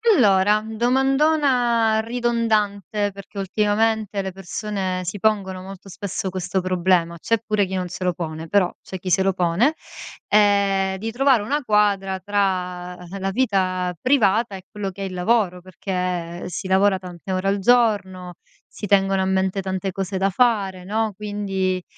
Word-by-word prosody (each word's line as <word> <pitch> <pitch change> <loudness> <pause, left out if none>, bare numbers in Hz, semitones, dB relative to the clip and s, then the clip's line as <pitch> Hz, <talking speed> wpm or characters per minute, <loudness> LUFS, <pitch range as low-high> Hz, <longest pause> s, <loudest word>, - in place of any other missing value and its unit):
Allora, 210 - +4
domandona 250 -1 +2
ridondante, 220 -4 0
perché, 200 +1 -10
ultimamente, 210 +1 0
le 190 0 -4
persone 190 0 -4
si 185 +3 -4
pongono 195 -3 0
molto 195 0 -10
spesso 190 0 -4
questo 185 +1 -2
problema. 180 -2 +1
C'è 230 +7 0
pure 210 -2 +1
chi 190 - -7
non 185 -1 -2
se 185 +1 -6
lo 180 -1 +1
pone, 160 -1 -6
però, 185 0 +2
c'è 190 - -7
chi 185 - -5
se 190 +2 +3
lo 195 0 +2
pone, 180 - +2 0.5
ehm, 200 -2 +3
di 225 +4 -4
trovare 260 -1 +3
una 285 +8 -1
quadra 200 -4 +1
tra 185 -2 -1 0.2
la 195 0 -2
vita 185 -6 0
privata, 230 -5 +2
e 190 - -9
quello 205 -2 -4
che 195 - -10
è - - -2
il 190 - -6
lavoro, 180 -1 +1
perché 180 -2 -4
si 185 +2 -5
lavora 190 0 +3
tante 180 0 -8
ore 185 +1 -1
al 200 +1 +2
giorno, 195 -5 +1 0.3
si - - -8
tengono 195 -1 +3
a - - 0
mente 190 +1 0
tante 190 0 -3
cose 195 +1 -3
da 195 +1 +2
fare, 195 -4 +1
no, 215 +3 -1
quindi, 195 -3 -2
195 Hz, 160 wpm, -22 LUFS, 185-215 Hz, 0.5 s, Allora